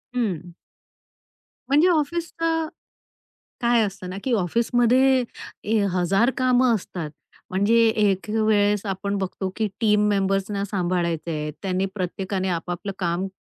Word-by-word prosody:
हं. 180 Hz, -8 st, -2 dB, 1.2 s
म्हणजे 300 Hz, +6 st, +5 dB
ऑफिसचं 330 Hz, 0 st, 0 dB, 0.9 s
काय 235 Hz, -1 st, +4 dB
असतं 190 Hz, -2 st, -6 dB
ना, 190 Hz, -, -5 dB
की 255 Hz, -, 0 dB
ऑफिसमध्ये 245 Hz, +6 st, +3 dB, 0.5 s
ए 225 Hz, -, +4 dB
हजार 195 Hz, +7 st, +2 dB
कामं 255 Hz, -1 st, +3 dB
असतात. 175 Hz, -5 st, -5 dB, 0.4 s
म्हणजे 200 Hz, +5 st, +2 dB
एक 205 Hz, -2 st, +1 dB
वेळेस 210 Hz, -1 st, +2 dB
आपण 200 Hz, +1 st, -2 dB
बघतो 190 Hz, 0 st, -3 dB
की 220 Hz, -2 st, 0 dB
टीम 210 Hz, -1 st, +3 dB
मेंबर्सना 195 Hz, 0 st, 0 dB
सांभाळायचं 175 Hz, -4 st, -1 dB
आहे, 150 Hz, -1 st, -3 dB
त्यांनी 190 Hz, 0 st, 0 dB
प्रत्येकाने 190 Hz, +1 st, -2 dB
आपापलं 175 Hz, +3 st, -3 dB
काम 175 Hz, +2 st, -1 dB
200 Hz, 115 wpm, -23 LUFS, 185-235 Hz, 1.2 s, म्हणजे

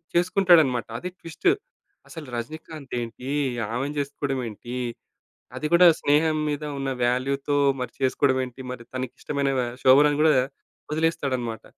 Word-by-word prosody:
చేసుకుంటాడన్నమాట. 175 Hz, -, +4 dB
అది 180 Hz, -, -5 dB
ట్విస్ట్. 170 Hz, -, 0 dB, 0.6 s
అసలు 160 Hz, -4 st, -9 dB
రజనీకాంత్ 150 Hz, +3 st, -7 dB
ఏంటి? 120 Hz, +3 st, -7 dB, 0.4 s
ఆమెని 140 Hz, +5 st, -2 dB
చేసుకోవడం 140 Hz, -1 st, -2 dB
ఏంటి? 120 Hz, +3 st, -8 dB, 0.8 s
అది 150 Hz, -, -2 dB
కూడా 175 Hz, +1 st, +7 dB
స్నేహం 155 Hz, +2 st, +2 dB
మీద 145 Hz, 0 st, -3 dB, 0.2 s
ఉన్న 135 Hz, 0 st, -2 dB
వాల్యూ‌తో 135 Hz, +4 st, 0 dB, 0.3 s
మరి 125 Hz, -, -4 dB
చేసుకోవడం 130 Hz, 0 st, +2 dB
ఏంటి? 125 Hz, +1 st, -10 dB
మరి 125 Hz, -2 st, -7 dB
తనకి 130 Hz, -1 st, -3 dB
ఇష్టమైన 140 Hz, -1 st, -1 dB
వ -, -, +3 dB, 0.2 s
శోభనని 145 Hz, +3 st, +6 dB
గూడా 155 Hz, 0 st, +6 dB
వ -, -, +5 dB, 0.5 s
వదిలేస్తాడన్నమాట. 130 Hz, -8 st, -1 dB
140 Hz, 130 wpm, -25 LUFS, 130-155 Hz, 0.8 s, కూడా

